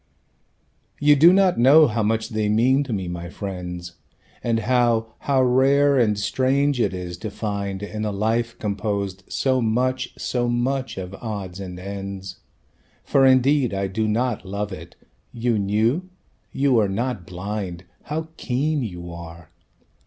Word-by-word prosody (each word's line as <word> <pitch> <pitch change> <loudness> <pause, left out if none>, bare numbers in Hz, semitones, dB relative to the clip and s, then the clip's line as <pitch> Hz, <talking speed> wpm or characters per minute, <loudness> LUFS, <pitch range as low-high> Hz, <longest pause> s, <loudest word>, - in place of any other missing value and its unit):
"You 145 0 +5
do 160 +5 +7
not 190 -6 +3
know 145 +6 +7
how 115 -4 0
much 110 +2 0
they 110 -2 -1
mean 125 +6 +3
to 130 - -6
me, 95 -4 -2
my 85 0 -5
friends, 90 -3 -6 0.5
And 115 -1 +1
how, 115 -2 +1
how 135 -2 +2
rare 135 +2 +4
and 105 -4 +2
strange 130 +6 +1
it - - +2
is, 90 -2 -6
to 110 +4 -5
find 100 -2 -4
In 105 +1 -4
a 105 - -1
life 115 +3 -1
composed 100 -2 -3
so 130 -1 +1
much, 125 +3 0
so 120 -1 -1
much 130 +1 -1
of 95 0 -6
odds 100 -5 -5
and 90 -2 -7
ends, 95 0 -6 0.7
(For 135 -1 +4
indeed 130 -3 +3
I 100 0 -1
do 110 +3 -1
not 120 +1 0
love 100 +2 -4
it... 85 -1 -9 0.4
you 115 -2 0
knew? 110 - +1 0.4
you 135 -4 +2
are 105 -2 +2
not 110 -3 -3
blind! 95 -1 -5 0.2
How 160 +2 -4
keen 145 +4 -1
you 90 -6 -6
are!) 85 -1 -10
110 Hz, 150 wpm, -23 LUFS, 95-130 Hz, 0.7 s, do